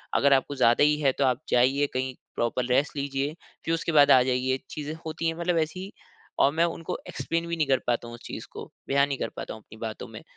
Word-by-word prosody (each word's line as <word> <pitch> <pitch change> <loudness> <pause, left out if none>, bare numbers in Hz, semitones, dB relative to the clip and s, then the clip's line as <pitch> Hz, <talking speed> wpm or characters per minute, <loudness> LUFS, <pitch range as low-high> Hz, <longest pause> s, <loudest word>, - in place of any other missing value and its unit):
अगर 140 0 +5
आपको 135 +1 +1
ज़्यादा 120 0 +4
ही 150 0 +4
है 140 -2 +4
तो - - +3
आप 130 -1 +1
जाइए 135 +4 +3
कहीं 130 0 -2 0.2
प्रॉपर 120 +1 0
रेस्ट 140 +5 +2
लीजिए, 140 +1 -2 0.3
फिर 165 - +1
उसके 165 0 -1
बाद 145 0 +7
आ 130 - +8
जाइए।" 130 +1 0
चीज़ें 150 0 -5
होती 160 +1 -2
है 165 +1 -2
मतलब 170 0 +1
ऐसी 185 +5 -8 0.5
और 140 - +5
मैं 165 +2 +2
उनको 165 -1 -4
एक्सप्लेन 165 0 -2
भी 170 - -2
नहीं 155 -3 +1
कर 135 -2 +3
पाता 120 -1 0
हूँ 120 - -9
उस 120 - -15
चीज़ - - -6
को, - - -9 0.2
बयान 140 +1 +3
नहीं 140 -1 -2
कर - - -3
पाता - - -5
हूँ 110 - -11
अपनी 110 - -14
बातों 110 - -7
में। - - -10
140 Hz, 245 wpm, -26 LUFS, 130-160 Hz, 0.5 s, आ